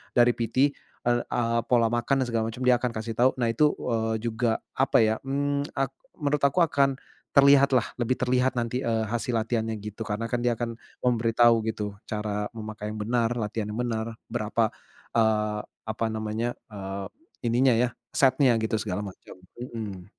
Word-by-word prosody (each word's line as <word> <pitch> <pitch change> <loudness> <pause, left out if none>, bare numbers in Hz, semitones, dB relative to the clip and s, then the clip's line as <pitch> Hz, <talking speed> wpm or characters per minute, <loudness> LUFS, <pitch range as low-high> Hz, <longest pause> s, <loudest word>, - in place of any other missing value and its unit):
dari 120 0 +6
PT. 130 +5 +1 0.3
Eee, 120 0 +2
a 115 -1 +1
pola 115 -2 +3
makan 130 +3 +1
dan - - -4
segala 115 -1 +1
macem, 115 +3 -5
dia 125 -1 +5
akan 125 -1 -1
kasih 110 +1 -3
tau. 125 +2 +5
Nah 120 -3 +1
itu, 150 +6 +3
eee, 110 -2 -1
juga 115 0 0
apa 135 -3 +3
ya, 110 0 +1
mmm, 140 +1 -1
ak 135 -1 0 0.2
menurut 145 0 0
aku 145 +6 +4
akan 140 -4 +2 0.4
terlihat 140 -1 +6
lah 125 -4 +3
lebih 120 +1 +2
terlihat 125 +1 +1
nanti, 120 +1 -1
eee, 115 -1 +1
hasil 120 +1 -2
latihannya 115 0 0
gitu 105 +1 -6
karena 110 +2 -3
kan 120 - +1
dia 120 0 +2
akan 115 0 -4 0.3
memberitahu 115 -1 +4
gitu, 105 -2 -3
cara 105 -1 -2
memakai 110 -1 -6
yang 110 - -6
benar, 115 +1 +1
latihan 110 -1 -2
yang 115 - -4
benar, 115 -1 -2 0.2
berapa, 110 -1 0 0.5
eee, 105 -1 +2 0.2
apa 110 +1 -2
namanya, 110 +2 -2 0.2
eee, 95 -1 -5 0.4
ininya 125 +2 +4
ya, 120 +2 +2 0.2
setnya 135 -1 +4
gitu 110 0 0
segala 105 -2 -3
macam. 95 -3 -9 0.2
Mhm. 110 -7 -6
115 Hz, 170 wpm, -26 LUFS, 110-125 Hz, 0.5 s, dari